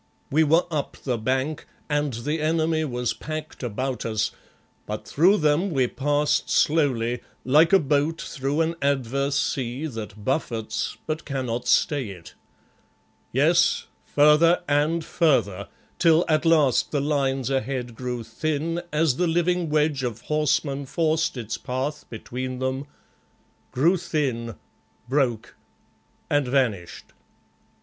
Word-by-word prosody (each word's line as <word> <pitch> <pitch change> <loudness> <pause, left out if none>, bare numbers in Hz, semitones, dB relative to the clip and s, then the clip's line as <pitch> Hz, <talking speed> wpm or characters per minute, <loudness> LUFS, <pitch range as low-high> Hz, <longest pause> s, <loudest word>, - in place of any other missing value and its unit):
We 155 +3 +4
were 165 +3 +3
up 150 -3 -3
the 125 -4 -1
bank 130 +6 -1 0.2
and 145 -1 0
the 145 +7 -3
enemy 160 0 +1
was 125 -4 -2
packed 155 0 -7
about 125 +2 -3
us, 110 -1 -1 0.6
but 105 0 -5
through 185 +8 +4
them 155 +4 +2
we 135 -7 +2
passed 145 +4 0
slowly, 125 -6 +2 0.3
like 150 +6 +5
a 195 - +8
boat 150 0 0
through 140 +2 -2
an 165 +1 0
adverse 140 0 0
sea 130 +3 -2
that 110 -6 -7
buffets 115 -6 -2
but 155 0 -3
cannot 125 -3 -3
stay 135 -2 +2
it. 90 -4 -11 1.0
Yes, - - +3 0.2
further 150 +4 +4
and 150 +3 +1
further, 105 - +1 0.3
till 165 0 +4
at 155 0 +1
last 140 -9 +3
the 145 - 0
lines 135 -2 0
ahead 130 -2 -2
grew 125 0 -4
thin 155 +8 -2
as 150 -3 +2
the 180 - +1
living 175 0 +1
wedge 150 -2 +1
of 120 -3 -4
horsemen 140 -1 0
forced 160 -1 0
its 115 -1 -4
path 135 +4 -4
between 125 +3 -5
them 130 +2 -2 0.8
grew 165 +9 +3
thin, 130 - -2 0.5
broke 125 -4 0 0.7
and 145 -2 +1
vanished. 120 -9 -1
140 Hz, 125 wpm, -24 LUFS, 125-155 Hz, 1.0 s, a